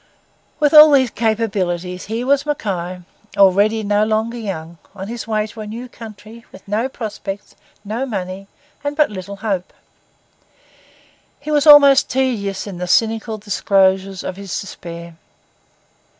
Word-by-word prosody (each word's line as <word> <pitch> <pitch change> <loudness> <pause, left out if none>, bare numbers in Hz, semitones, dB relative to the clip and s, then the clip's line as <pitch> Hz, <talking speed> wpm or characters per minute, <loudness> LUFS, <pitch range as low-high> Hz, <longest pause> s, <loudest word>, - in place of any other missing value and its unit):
With 295 0 +2
all 305 0 +10
these 265 -5 +3
capabilities, 195 -6 -2
here 225 +3 -3
was 280 +1 +2
Mackay, 185 - -3 0.4
already 205 +3 +4
no 205 +1 +2
longer 220 +2 -1
young, 170 -6 -6 0.2
on 195 +2 -7
his 235 -1 -6
way 215 -1 0
to 220 +1 -10
a 210 - -7
new 235 +4 -7
country, 225 0 -12
with 190 - -15
no 220 +6 -1
prospects, 205 -4 -7 0.3
no 230 +6 -3
money, 195 -3 -5 0.4
and 290 +1 -3
but 300 -7 +3
little 200 0 -7
hope. 190 -4 -2 1.7
He 300 +2 -6
was 295 0 +2
almost 280 -2 +8
tedious 235 -7 -1
in 195 -4 -8
the 180 - -3
cynical 225 +3 +1
disclosures 195 -2 +1
of 185 - -5
his 195 -3 -5
despair. 170 -3 -9
210 Hz, 140 wpm, -19 LUFS, 190-235 Hz, 1.7 s, all